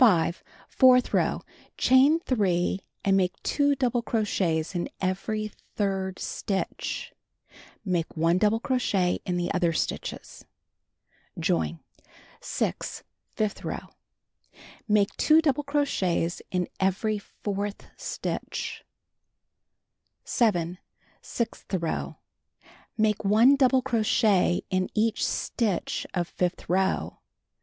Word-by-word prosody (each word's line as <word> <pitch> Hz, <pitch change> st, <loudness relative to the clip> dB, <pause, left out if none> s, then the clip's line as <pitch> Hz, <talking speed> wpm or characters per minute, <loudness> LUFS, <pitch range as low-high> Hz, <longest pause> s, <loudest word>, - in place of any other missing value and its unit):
Fourth 255 Hz, -1 st, +5 dB
row: -, -, +1 dB, 0.3 s
Chain 270 Hz, +5 st, +5 dB
3 190 Hz, -, +1 dB, 0.3 s
and 195 Hz, -1 st, +4 dB
make 185 Hz, -1 st, +2 dB
2 285 Hz, -1 st, +2 dB
double 245 Hz, -3 st, 0 dB, 0.4 s
in 170 Hz, 0 st, 0 dB
every 210 Hz, +3 st, -2 dB, 0.2 s
third 190 Hz, -2 st, -1 dB
stitch, 195 Hz, -2 st, -3 dB, 0.7 s
(Make 175 Hz, -4 st, -1 dB
1 165 Hz, +3 st, +3 dB
double 215 Hz, +2 st, +3 dB
crochet 200 Hz, -8 st, +1 dB, 0.5 s
stitches.) -, -, -4 dB, 0.9 s
Join. 80 Hz, 0 st, 0 dB, 0.6 s
6. -, -, -3 dB, 0.3 s
Fifth 215 Hz, -1 st, -2 dB
row: -, -, -5 dB, 1.0 s
Make 210 Hz, -2 st, +2 dB
2 310 Hz, +1 st, +5 dB
double 295 Hz, -2 st, +1 dB
crochets 275 Hz, -, 0 dB
in 180 Hz, -1 st, -1 dB
every 205 Hz, +3 st, +1 dB
fourth 205 Hz, 0 st, -5 dB
stitch. -, -, -4 dB, 1.4 s
7. 180 Hz, -6 st, +1 dB, 0.4 s
Sixth 235 Hz, -, -4 dB
row: 170 Hz, -3 st, -2 dB, 0.8 s
Make 215 Hz, -1 st, +1 dB
1 220 Hz, +7 st, +6 dB
double 260 Hz, -1 st, +3 dB
crochet 215 Hz, -7 st, +2 dB
in 185 Hz, 0 st, +1 dB
each 220 Hz, +1 st, +1 dB
stitch 210 Hz, -7 st, -1 dB
of 175 Hz, -2 st, 0 dB
fifth 180 Hz, 0 st, -2 dB
row. 190 Hz, +2 st, 0 dB
205 Hz, 90 wpm, -27 LUFS, 180-240 Hz, 1.4 s, 1